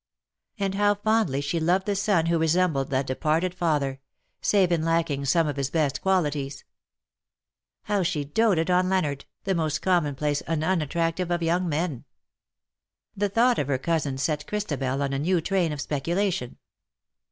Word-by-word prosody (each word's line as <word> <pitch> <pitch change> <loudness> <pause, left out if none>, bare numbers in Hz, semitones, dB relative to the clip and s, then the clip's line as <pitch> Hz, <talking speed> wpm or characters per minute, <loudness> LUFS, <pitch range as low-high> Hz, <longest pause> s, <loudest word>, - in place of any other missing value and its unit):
And 195 -2 -1
how 205 +1 +3
fondly 205 -9 +1
she 145 +4 -1
loved 180 +4 +1
the 205 - 0
son 195 -4 +2
who 165 0 +1
resembled 160 -4 +1
that 135 -1 0
departed 155 +7 0
father 145 -6 -1 0.2
— - - -47
save 190 -4 +3
in 165 -2 +1
lacking 165 -4 0
some 165 +4 +3
of 145 -2 -3
his 135 -1 -1
best 150 -3 0
qualities! 150 -7 -1 1.2
How 205 -1 0
she 165 -5 -1
doated 180 +1 +2
on 180 +1 +3
Leonard, 150 -8 -1 0.2
the 195 - 0
most 155 -3 -1
commonplace 150 -5 +1
and 160 -1 -2
unattractive 170 +1 0
of 175 -1 0
young 175 +2 +1
men! 155 -4 -2 1.1
The 205 +1 0
thought 235 +4 +3
of 140 - -1
her 140 -2 +1
cousin 145 -2 -1
set 150 +2 -2
Christabel 140 -10 -2
on 140 0 -2
a 135 - -1
new 175 +4 +2
train 175 -1 0
of 150 - -5
speculation. 155 0 -2
165 Hz, 165 wpm, -25 LUFS, 145-185 Hz, 1.2 s, how